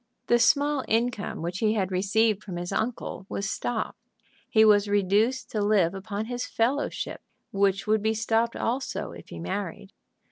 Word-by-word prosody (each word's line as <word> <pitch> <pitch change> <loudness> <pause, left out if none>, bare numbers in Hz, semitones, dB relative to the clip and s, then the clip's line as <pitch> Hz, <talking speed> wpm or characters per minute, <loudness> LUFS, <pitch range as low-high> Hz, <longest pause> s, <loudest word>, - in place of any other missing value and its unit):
The 240 - +3
small 285 +2 +3
income 225 -6 -1
which 175 +2 -3
he 215 -1 +2
had 195 -3 -1
received 205 +3 +2
from 185 -4 -7
his 175 0 -4
uncle 220 -4 -3
was 195 - -2
stopped. 225 +2 -3 0.5
He 220 0 +5
was 210 -1 +5
reduced 205 +5 +1
to 215 - -1
live 200 -4 +3
upon 200 +2 -4
his 245 +1 -4
fellowship, 260 +6 -1 0.3
which 195 0 +1
would 215 0 +2
be 220 +1 +1
stopped 225 +1 +1
also 250 - -2
if 85 0 -12
he - - -8
married. 195 - -5
215 Hz, 165 wpm, -27 LUFS, 195-230 Hz, 0.5 s, He